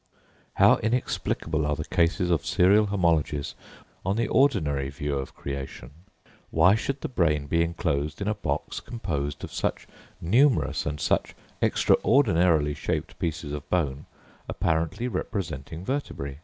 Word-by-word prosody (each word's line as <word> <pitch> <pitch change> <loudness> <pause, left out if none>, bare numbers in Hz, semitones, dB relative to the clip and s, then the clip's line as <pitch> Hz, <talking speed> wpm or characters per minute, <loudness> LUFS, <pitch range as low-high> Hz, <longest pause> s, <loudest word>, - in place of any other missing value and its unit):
How - - +6
inexplicable 105 -9 -1
are 75 0 0
the 75 0 -5
cases 90 0 +1
of 80 -6 +1
serial 100 +4 +4
homologies 80 -7 0 0.5
on 95 +2 0
the 115 - 0
ordinary 75 - +2
view 70 +1 -3
of 65 -1 -5
creation! 70 -2 -6 0.6
Why 85 +4 +5
should 135 +5 -2
the - - -2
brain 80 - +1
be 85 +3 +1
enclosed 80 -3 -2
in 100 - -3
a 105 - +2
box 105 - -3
composed 75 -11 -4
of - - -7
such - - -2 0.3
numerous 125 - +2
and 75 0 -3
such - - 0 0.3
extraordinarily 85 - +3
shaped 75 - -3
pieces 80 -3 -3
of 75 -1 -6
bone 70 -6 -1 0.4
apparently 80 +8 -1
representing 80 - -4
vertebræ? 70 - -3
80 Hz, 135 wpm, -26 LUFS, 75-100 Hz, 0.6 s, How